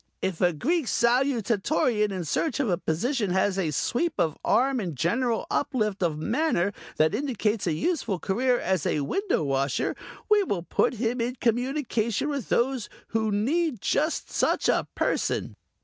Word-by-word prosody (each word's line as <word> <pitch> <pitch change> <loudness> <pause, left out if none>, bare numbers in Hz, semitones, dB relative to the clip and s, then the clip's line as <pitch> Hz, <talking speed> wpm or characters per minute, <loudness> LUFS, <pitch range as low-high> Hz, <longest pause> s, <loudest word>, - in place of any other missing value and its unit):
If 185 -4 -3
a 180 -1 +4
Greek 290 - 0
Salutatorian 235 -1 +2
in 185 -3 -3
search 285 - -1
of 275 - +1
a 175 - +2
position 210 - -1
has 190 +1 +1
the 180 -5 0
sweep 245 - 0
of 155 -3 +1
arm 265 +1 +2
and 175 -8 -4
general 225 - 0
uplift 215 -9 0
of 165 -4 +1
manner 220 - 0 0.2
that 155 0 +3
indicates 225 -7 -1
a 165 - +2
useful 230 - -1
career 245 +8 +1
as 185 -5 0
a 150 - 0
window 380 - 0
washer, 135 -1 0 0.3
we 425 -1 +5
will 200 - -2
put 210 - +1
him 235 +2 -1
in 245 +2 -1
communication 245 0 0
with 280 -6 -3
those 250 -1 +1 0.2
who 220 -1 0
need 265 - 0
just 310 - 0
such - - +1
a - - +2
person." - - -1
230 Hz, 160 wpm, -26 LUFS, 185-265 Hz, 0.3 s, we